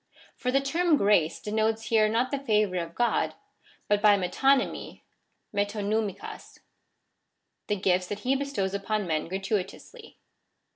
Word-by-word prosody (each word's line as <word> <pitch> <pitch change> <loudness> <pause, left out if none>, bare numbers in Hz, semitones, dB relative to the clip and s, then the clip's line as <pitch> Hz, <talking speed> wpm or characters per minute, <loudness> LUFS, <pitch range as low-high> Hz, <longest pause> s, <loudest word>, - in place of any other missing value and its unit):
For 250 - -2
the 275 +1 +3
term 325 +3 +2
grace 200 - +2
denotes 220 +1 -1
here 215 -2 +4
not 235 +4 0
the 280 - -1
favour 210 -7 +1
of 170 -1 -4
God, 240 0 +1 0.5
but 205 0 +2
by 205 -1 +6
metonymy^ 265 +9 0 0.5
(ji£TQ)vv/jLKQ)<i), 205 0 -3 1.1
the 210 - +1
gifts 185 -2 +1
that 205 +2 -5
he 260 +4 +1
bestows 270 -9 -2
upon 200 +1 -1
men 155 -2 -1
gratuitously. 195 - -5
210 Hz, 130 wpm, -27 LUFS, 195-250 Hz, 1.1 s, by